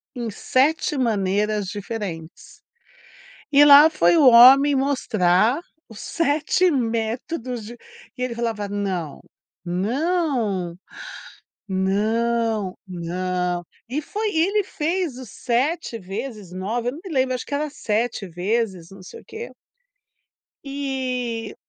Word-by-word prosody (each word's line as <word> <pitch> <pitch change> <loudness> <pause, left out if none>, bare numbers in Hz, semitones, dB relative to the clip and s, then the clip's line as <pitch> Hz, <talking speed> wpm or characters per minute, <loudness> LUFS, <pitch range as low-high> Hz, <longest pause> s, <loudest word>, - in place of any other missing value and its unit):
em 240 -2 -4
7 280 +8 +1
maneiras 210 -3 0
diferentes. 195 -5 -7 0.9
E 290 0 +7
lá 290 +2 +9
foi 330 +1 +3
o 285 -4 +6
homem 265 +4 +8
mostrar 235 - +2 0.3
os 220 - -11
7 330 +3 +1
métodos 240 - -2
de 235 - -9 0.4
e 250 - -3
ele 255 - -2
falava: 225 -3 -2
"Não, 190 -6 -3 0.5
não, 220 - -1 0.9
não, 215 +2 0
não." 180 0 -3 0.3
E 275 +5 -2
foi 425 +7 -3
ele 395 +6 +2
fez 330 -5 -2
o 260 - -9
7 245 - -2
vezes, 205 0 -7
9, 225 +6 -3
eu - - -1
não 300 - -9
me 380 - -8
lembro, 260 -1 +1
acho 250 - -4
que - - -4
era 300 +2 -1
7 220 -5 -2
vezes, 185 0 -2
não 195 -1 -13
sei 460 - -11
o - - -21
quê. 455 +2 -8 1.1
E 255 -5 -3
235 Hz, 120 wpm, -22 LUFS, 195-280 Hz, 1.1 s, lá